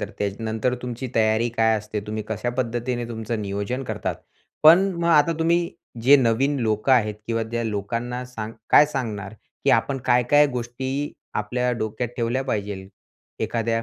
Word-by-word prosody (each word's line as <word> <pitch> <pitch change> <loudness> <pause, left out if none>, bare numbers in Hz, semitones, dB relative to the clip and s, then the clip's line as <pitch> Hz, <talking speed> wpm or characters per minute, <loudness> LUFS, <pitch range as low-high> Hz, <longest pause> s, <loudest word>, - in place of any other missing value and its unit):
तर 105 - -4
त्यानंतर 110 +4 -1
तुमची 125 +1 -5
तयारी 110 +1 +2
काय 115 0 +4
असते, 105 0 -5
तुम्ही 110 +1 -3
कशा 110 +3 -2
पद्धतीने 120 0 -1
तुमचं 115 -1 -4
नियोजन 100 +6 -3
करता. - - -2 0.5
पण 160 +3 +9 0.2
मग 170 0 -1
आता 165 0 +5
तुम्ही 170 +1 +2 0.3
जे 140 +4 +8
नवीन 135 +3 +2
लोक 110 +2 0
आहेत 110 -5 +4
किंवा 115 -1 0
त्या 115 0 -1
लोकांना 115 +4 -3
सांग 115 -3 -7 0.2
काय 150 - +8
सांगणार 110 -8 -4 0.3
की - - +4
आपण 135 -1 -1
काय-काय 125 +5 +4
गोष्टी 130 +2 -3 0.2
आपल्या 125 +4 -1
डोक्यात 115 +1 -3
ठेवल्या 120 +2 0
पाहिजेत 100 -6 -3 0.5
एखाद्या 115 +1 0
115 Hz, 150 wpm, -23 LUFS, 110-130 Hz, 0.5 s, पण